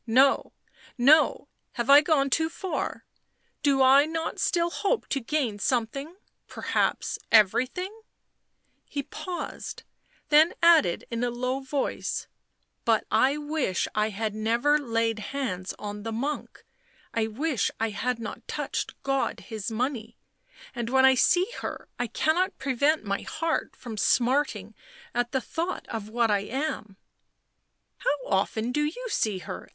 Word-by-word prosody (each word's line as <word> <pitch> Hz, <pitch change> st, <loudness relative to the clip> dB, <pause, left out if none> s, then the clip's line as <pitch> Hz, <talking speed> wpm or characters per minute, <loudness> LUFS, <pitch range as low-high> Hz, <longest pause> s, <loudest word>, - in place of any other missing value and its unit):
" -, -, -47 dB
No, 265 Hz, +4 st, +4 dB, 0.5 s
no 285 Hz, +3 st, +5 dB
— -, -, -50 dB
have 235 Hz, -1 st, -2 dB
I 280 Hz, +1 st, +9 dB
not 295 Hz, -, -3 dB
gone 280 Hz, -4 st, +3 dB
too 320 Hz, +3 st, +2 dB
far? 375 Hz, +2 st, -4 dB, 0.6 s
Do 275 Hz, -2 st, +3 dB
I 275 Hz, +3 st, +6 dB
not 325 Hz, 0 st, -3 dB
still 340 Hz, -1 st, +1 dB
hope 415 Hz, +6 st, -1 dB
to 275 Hz, -, 0 dB
gain 245 Hz, -4 st, -1 dB
some 235 Hz, +2 st, +2 dB
thing 275 Hz, +9 st, -8 dB, 0.2 s
— -, -, -50 dB
perhaps -, -, -1 dB
everything 255 Hz, -, +3 dB, 0.5 s
?" -, -, -46 dB
He 280 Hz, -, -3 dB
paused, 355 Hz, +5 st, -6 dB, 0.5 s
then 310 Hz, +3 st, +5 dB
added 325 Hz, -, +5 dB
in 230 Hz, +1 st, -2 dB
a 245 Hz, -, +1 dB
low 250 Hz, +2 st, -2 dB
voice, 270 Hz, 0 st, -2 dB, 0.3 s
" -, -, -48 dB
But 225 Hz, -2 st, +2 dB
I 260 Hz, +7 st, +3 dB
wish 295 Hz, -, -1 dB
I 215 Hz, 0 st, +1 dB
had 215 Hz, +1 st, -3 dB
never 235 Hz, +7 st, +2 dB
laid 230 Hz, -4 st, 0 dB
hands 210 Hz, -6 st, -4 dB
on 205 Hz, 0 st, -6 dB
the 225 Hz, +2 st, -4 dB
monk. 275 Hz, +7 st, -4 dB, 0.5 s
I 225 Hz, -1 st, +1 dB
wish 260 Hz, +3 st, 0 dB
I 225 Hz, 0 st, +1 dB
had 245 Hz, +4 st, -1 dB
not 230 Hz, -2 st, -7 dB
touched -, -, -3 dB
God 270 Hz, 0 st, 0 dB
His 220 Hz, -3 st, -5 dB
money 235 Hz, -1 st, -3 dB, 0.3 s
— -, -, -20 dB
and 235 Hz, -1 st, -3 dB
when 265 Hz, +1 st, +5 dB
I 265 Hz, -, +7 dB
see 350 Hz, +8 st, +4 dB, 0.2 s
her -, -, -6 dB
I 245 Hz, -, 0 dB
cannot 345 Hz, +9 st, +1 dB
prevent 280 Hz, +2 st, +1 dB
my 200 Hz, 0 st, -1 dB
heart 325 Hz, 0 st, -2 dB
from 230 Hz, -4 st, -8 dB
smarting 240 Hz, -2 st, +1 dB, 0.4 s
at 240 Hz, 0 st, 0 dB
the 265 Hz, -1 st, 0 dB
hought 340 Hz, +8 st, -4 dB
of 220 Hz, -3 st, -5 dB
what 230 Hz, 0 st, +1 dB
I 205 Hz, -, +3 dB
am?" 220 Hz, -3 st, -4 dB, 0.5 s
" -, -, -51 dB
How 295 Hz, -, +1 dB
often 220 Hz, +4 st, 0 dB
do 295 Hz, +3 st, +1 dB
you 345 Hz, +12 st, -3 dB
see 215 Hz, -, 0 dB
her 185 Hz, -, -8 dB
260 Hz, 160 wpm, -27 LUFS, 225-295 Hz, 0.6 s, I